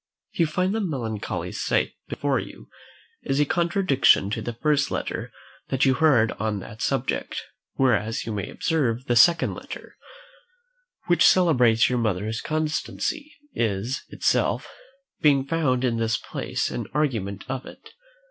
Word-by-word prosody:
You 165 - +1
find 180 +5 0
the 225 - -1
melancholy 120 - -3
sight - - 0 0.2
before - - 0
you - - -10 0.5
is 135 +1 -1
a 150 - +4
contradiction 170 - +3
to - - -2
the 120 - -4
first 145 +2 +1
letter - - -4 0.4
that 130 0 +1
you 135 - +4
heard 130 -7 +4
on 110 0 -1
that 110 +3 -9
subject; - - -1 0.3
whereas 115 -4 +1
you 115 - -4
may 100 -3 -4
observe, 130 -7 -1
the 120 - +1
second 170 +9 +5
letter, - - -9 1.1
which 175 -1 +3
celebrates 125 -11 +5
your 125 -1 0
mother's 110 0 -1
constancy, 155 - -2 0.2
is 115 +4 -1
itself, - - 0 0.5
being 140 -3 +3
found 140 -5 0
in 120 -3 +1
this 115 0 +1
place, - - -3
an - - -4
argument 110 -10 -1
of 130 0 -4
it. 445 - -13
130 Hz, 140 wpm, -24 LUFS, 110-155 Hz, 1.1 s, second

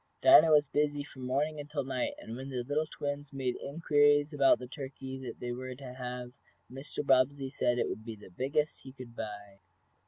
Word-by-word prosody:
Dinah 330 - +9
was 150 -1 +6
busy 145 0 0
from 130 -3 -8
morning 150 +4 0
until 145 -1 -3
night, 130 -1 -2
and 115 - -8
when 130 +2 -7
the 125 -2 -2
little 145 +4 -1
twins 145 -1 -5
made 130 -3 -2
inquiries 145 0 +3
about 140 -2 +5
the 125 - -8
turkey 130 -1 -7
they 120 - -4
were 130 +1 -5
to 130 -1 -9
have 125 -1 -6 0.4
Mr. 135 +2 -5
Bobbsey 135 0 +3
said 120 -3 +1
it - - +1
would 110 - -5
be 115 -1 -6
the 105 -3 -14
biggest 140 - -1
he 130 - -11
could 125 -3 -11
buy. 105 -3 -7
135 Hz, 190 wpm, -31 LUFS, 125-145 Hz, 0.4 s, Dinah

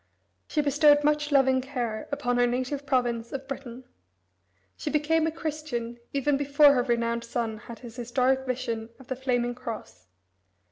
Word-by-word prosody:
She 305 - +1
bestowed 290 +1 +5
much 300 0 +1
loving 265 -2 +4
care 245 -5 -4
upon 245 -3 0
her 245 - +4
native 260 +4 -2
province 240 -3 0
of 270 0 -5
Britain. 260 -2 -7 0.9
She - - -4
became 315 +2 +2
a - - 0
Christian 300 -8 -4
even 280 0 +1
before 285 +1 +5
her 250 - +3
renowned 235 -1 0
son 230 -2 -3
had 235 +1 -10
his 240 -1 -11
historic 255 +2 +1
vision 230 -3 -3
of 265 - -16
the 260 - -1
flaming 245 -2 0
cross. 225 - -8
255 Hz, 155 wpm, -27 LUFS, 240-285 Hz, 0.9 s, bestowed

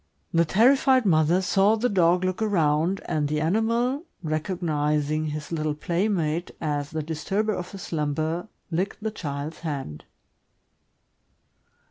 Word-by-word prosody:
The 170 0 +4
terrified 255 - +4
mother 170 +1 +3
saw 195 +3 +3
the 230 +3 +1
dog 180 -3 +3
look 185 +2 -1
around, 170 -3 +1
and 150 -2 0
the 150 +1 -1
animal, 230 - +1 0.2
recognizing 155 -2 -1
his 150 +1 -5
little 155 -2 -1
playmate 170 -1 -1
as 145 -2 -2
the 160 0 -3
disturber 190 +8 -1
of 180 -2 -5
his 195 -2 -8
slumber, 155 +3 -2 0.2
licked 190 +5 -2
the 220 - -1
child's 150 -5 -5
hand. 140 - -5
165 Hz, 125 wpm, -25 LUFS, 150-195 Hz, 0.2 s, The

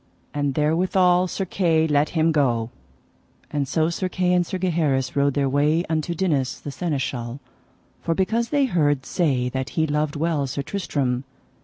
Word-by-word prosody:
And 145 -2 -1
therewithal 180 +4 +3
Sir 190 +2 -3
Kay 165 -4 +2
let 150 -1 +2
him 160 +1 +3
go. 120 -6 +1 0.8
And 145 -2 -1
so 160 +4 +1
Sir 185 +2 -2
Kay 180 0 +1
and 180 0 +3
Sir 185 +2 -4
Gaheris 155 -8 0
rode 140 -1 +2
their 140 -1 +1
way 150 +5 +2
unto 160 +1 -1
Dinas, 150 -8 0
the 145 - -7
Seneschal, 135 -6 -3 0.6
for 165 - -1
because 230 +6 0
they 285 -2 +2
heard 145 - +1
say 135 -8 0
that 130 +1 -3
he 160 - +3
loved 150 0 -1
well 150 -2 0
Sir 140 +2 -3
Tristram. 140 -7 -2
155 Hz, 165 wpm, -23 LUFS, 140-175 Hz, 0.8 s, therewithal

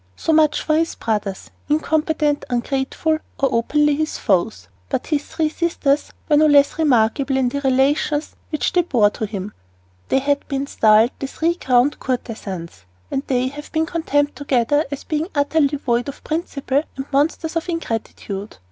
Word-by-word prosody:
So 325 - 0
much 310 -1 +3
for 310 - +1
his 330 +1 0
brothers 210 -3 -3 0.2
incompetent, 305 -1 +1
ungrateful, 270 +5 -1 0.2
or 275 - +3
openly 295 +6 +2
his 310 +1 -2
foes. 175 - 0 0.2
But - - -2
his 295 -2 0
three 315 -2 0
sisters 305 -4 0 0.2
were 295 - +4
no 310 +1 +5
less 285 +1 +4
remarkable 270 -1 +2
in 260 -2 +2
the 280 +3 -3
relations 280 +3 +1
which 305 - -1
they 360 - +4
bore 235 -11 +3
to 220 - -4
him. 200 0 -6 0.6
They - - +3
have 280 +1 0
been 275 -1 -2
styled 220 -2 +4
"the 275 - -3
three 330 +5 0
crowned 260 -4 +2
courtesans," 195 - -5 0.3
and 270 - 0
they 255 -1 +1
have 295 +2 -10
been 320 0 +1
condemned 290 -4 0
together 285 +1 +1
as 280 -1 -6
being 310 +1 -2
utterly 290 0 +2
void 245 -1 0
of 280 - -10
principle 290 -4 -1 0.2
and 270 - -4
monsters 315 +3 +1
of 330 +2 -2
ingratitude. 220 - -4
280 Hz, 165 wpm, -20 LUFS, 245-310 Hz, 0.6 s, no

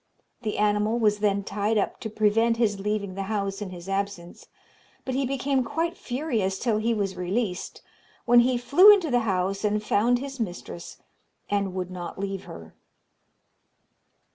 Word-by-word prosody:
The 215 -3 -3
animal 210 +2 +2
was 210 -3 +2
then 200 -1 +1
tied 205 +3 -1
up 200 - -1
to 220 - -5
prevent 225 +2 +2
his 210 -4 +1
leaving 200 -1 -2
the 195 - -4
house 200 -2 -2
in 205 - -4
his 175 0 -10
absence; 195 -3 -4 0.6
but 260 - -3
he 265 0 0
became 270 0 0
quite 330 +8 -2
furious 240 -8 -2
till 220 0 0
he 230 +2 0
was 200 -4 -1
released, 180 +2 -3 0.4
when 240 0 +6
he 245 +1 +3
flew 345 +12 +7
into 370 -8 +3
the 245 - +4
house 190 +2 -1
and 210 0 0
found 230 +4 +2
his 270 +1 -7
mistress, 175 -4 -6 0.5
and 200 -2 0
would 185 -1 -3
not 175 -1 -7
leave 195 0 -4
her. 80 0 -11
210 Hz, 165 wpm, -26 LUFS, 195-240 Hz, 0.6 s, flew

